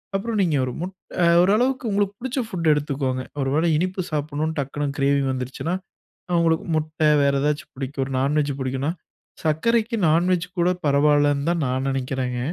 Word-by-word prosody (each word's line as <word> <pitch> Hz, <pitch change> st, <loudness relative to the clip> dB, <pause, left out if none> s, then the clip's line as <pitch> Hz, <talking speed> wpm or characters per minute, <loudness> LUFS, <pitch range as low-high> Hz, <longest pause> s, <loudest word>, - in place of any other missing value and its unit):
அப்புறம் 220 Hz, +2 st, -1 dB
நீங்க 170 Hz, -5 st, +2 dB
ஒரு 125 Hz, -, -3 dB
முட் 185 Hz, +1 st, -4 dB, 0.3 s
அ -, -, +5 dB, 0.2 s
ஓரளவுக்கு 240 Hz, +7 st, +2 dB
உங்களுக்கு 200 Hz, 0 st, +1 dB
புடிச்ச 260 Hz, +2 st, -3 dB
புட்ட 170 Hz, -5 st, -4 dB
எடுத்துக்கோங்க. 135 Hz, -3 st, -2 dB, 0.2 s
ஒரு 135 Hz, -, 0 dB
வேளை 165 Hz, +2 st, +2 dB
இனிப்பு 185 Hz, +3 st, -1 dB
சாப்பிடனுன்னு 155 Hz, +1 st, -2 dB
டக்குனு 145 Hz, +1 st, -2 dB
கிரேவிங் 140 Hz, -1 st, +2 dB
வந்துடுச்சுன்னா, 130 Hz, +7 st, -3 dB, 0.6 s
அவுங்களுக்கு 165 Hz, -2 st, +2 dB
முட்டை 155 Hz, 0 st, 0 dB
வேறு 140 Hz, 0 st, +2 dB
ஏதாச்சும் 150 Hz, +2 st, -1 dB
பிடிக்கும். 135 Hz, +1 st, -4 dB
ஒரு 135 Hz, -, -6 dB
நான் 140 Hz, +3 st, +1 dB
வெஜ் 145 Hz, -1 st, -1 dB
பிடிக்கும்ன்னா 135 Hz, +4 st, -1 dB, 0.5 s
சர்க்கரைக்கு 225 Hz, +9 st, +1 dB
நான் 170 Hz, +4 st, +3 dB
வெஜ் 180 Hz, -1 st, +1 dB
கூட 175 Hz, +1 st, +3 dB
பரவாயில்லன்னுதான் 145 Hz, +2 st, +3 dB
நான் 130 Hz, +1 st, -1 dB
நெனைக்கிறேங்க. 130 Hz, -1 st, -2 dB
150 Hz, 160 wpm, -23 LUFS, 140-175 Hz, 0.6 s, அ